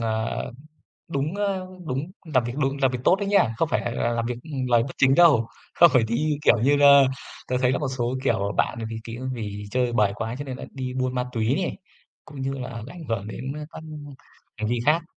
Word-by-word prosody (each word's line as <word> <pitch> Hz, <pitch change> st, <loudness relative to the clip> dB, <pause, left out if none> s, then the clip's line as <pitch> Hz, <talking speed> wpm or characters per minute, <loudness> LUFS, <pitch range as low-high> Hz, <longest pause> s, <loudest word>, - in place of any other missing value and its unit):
ờ, 110 Hz, -1 st, -2 dB, 0.6 s
đúng, 155 Hz, +2 st, -2 dB
ờ, 195 Hz, -2 st, -1 dB, 0.2 s
đúng 145 Hz, +5 st, -3 dB, 0.2 s
làm 130 Hz, -3 st, +4 dB
việc 120 Hz, 0 st, -4 dB
đúng, 135 Hz, -1 st, 0 dB
làm 135 Hz, -2 st, +4 dB
việc 125 Hz, -, -3 dB
tốt 185 Hz, -, +5 dB
đấy 200 Hz, -, -2 dB
nhá, 200 Hz, -, +3 dB
không 165 Hz, -, +1 dB
phải -, -, +1 dB
là 120 Hz, -, -3 dB
là 120 Hz, -, 0 dB
làm 115 Hz, 0 st, -1 dB
việc 120 Hz, +1 st, -2 dB, 0.3 s
lời 120 Hz, -1 st, +4 dB
bất 130 Hz, -, -6 dB
chính 135 Hz, 0 st, +5 dB
đâu, 145 Hz, -10 st, +6 dB, 0.3 s
không 170 Hz, -, +7 dB
phải 125 Hz, -3 st, +5 dB
đi, 145 Hz, +7 st, 0 dB
kiểu 150 Hz, -, +5 dB
như 140 Hz, +3 st, +4 dB
là, 140 Hz, -1 st, +8 dB, 0.4 s
tớ 130 Hz, -, -1 dB
thấy 125 Hz, -, +3 dB
là 130 Hz, -, +1 dB
một 145 Hz, -, -1 dB
số, 120 Hz, +1 st, -1 dB
kiểu, 100 Hz, -6 st, +1 dB
bạn -, -, +1 dB
vì 115 Hz, -, -5 dB
kí 115 Hz, -1 st, -7 dB
á, 125 Hz, -, -7 dB
vì 105 Hz, -3 st, -5 dB
chơi 125 Hz, -1 st, +1 dB
bời 105 Hz, -4 st, +3 dB
quá 115 Hz, +2 st, -4 dB
cho -, -, -3 dB
nên 130 Hz, -2 st, -5 dB
là -, -, -7 dB
đi 130 Hz, -2 st, -5 dB
buôn 130 Hz, 0 st, -1 dB
ma 125 Hz, -, +1 dB
túy 115 Hz, +1 st, +1 dB
này, 180 Hz, -, -3 dB, 0.5 s
cũng 145 Hz, -3 st, -9 dB
như 135 Hz, +1 st, -1 dB
là 125 Hz, -4 st, -6 dB
ảnh 170 Hz, +3 st, -9 dB
hưởng 105 Hz, -3 st, -2 dB
đến, 130 Hz, +5 st, -5 dB
ờ, 150 Hz, 0 st, -6 dB
các -, -, -9 dB, 0.8 s
hành 105 Hz, 0 st, -2 dB
vi 120 Hz, 0 st, 0 dB
khác. 160 Hz, +3 st, +3 dB
130 Hz, 240 wpm, -24 LUFS, 115-145 Hz, 0.8 s, là